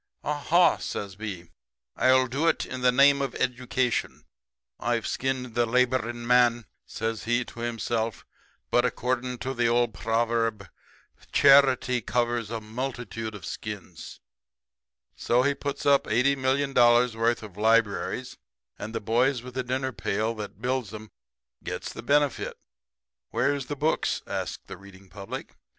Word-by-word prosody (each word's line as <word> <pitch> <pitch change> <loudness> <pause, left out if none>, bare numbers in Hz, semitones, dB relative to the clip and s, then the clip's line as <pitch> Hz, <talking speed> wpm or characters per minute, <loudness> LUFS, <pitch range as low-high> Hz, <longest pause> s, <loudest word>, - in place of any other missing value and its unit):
"'Aha!' 155 +4 +3
says 100 -2 -5
B, 95 -5 -7 0.4
'I'll 130 0 +4
do 135 +6 -1
it 165 - +1
in 130 0 -6
the 125 0 +4
name 140 +2 +5
of 135 -3 -3
Education. 125 -1 -1 0.6
I've 120 0 -1
skinned 130 -2 -2
the 120 0 +1
laboring 120 -1 0
man,' 120 -1 +4 0.2
says 115 0 -4
he 120 +2 +1
to - - -12
himself, 115 -1 -2 0.5
'but, - - +4
according 125 +1 -1
to 130 - -2
the 120 -2 +1
old 120 -1 +2
proverb, 115 -1 -1 0.6
"Charity 135 -3 +5
covers 120 -1 -1
a 115 0 -3
multitude 115 -1 -5
of 95 - -9
skins."' - - -7 1.0
"So 125 +1 +2
he 140 +1 +2
puts 140 0 -5
up 140 -1 +4
eighty 125 +5 +3
million 135 +1 0
dollars' 120 -1 +5
worth 115 +1 +1
of 105 -4 -10
libraries; 110 -1 +1 0.4
and 110 +2 -6
the - - 0
boys 120 +4 +1
with 125 0 -9
the 130 - -1
dinner 130 +1 -2
pail 105 +1 -1
that 105 -3 -8
builds 125 -4 -1
'em 110 0 -10 0.5
gets - - -5
the - - -7
benefit. 145 -1 +1 0.7
"'Where's 140 -2 0
the 145 - -3
books?' 155 +3 0
asks - - -4
the - - -9
reading 100 0 -16
public. 100 0 -8
120 Hz, 145 wpm, -26 LUFS, 115-130 Hz, 1.0 s, name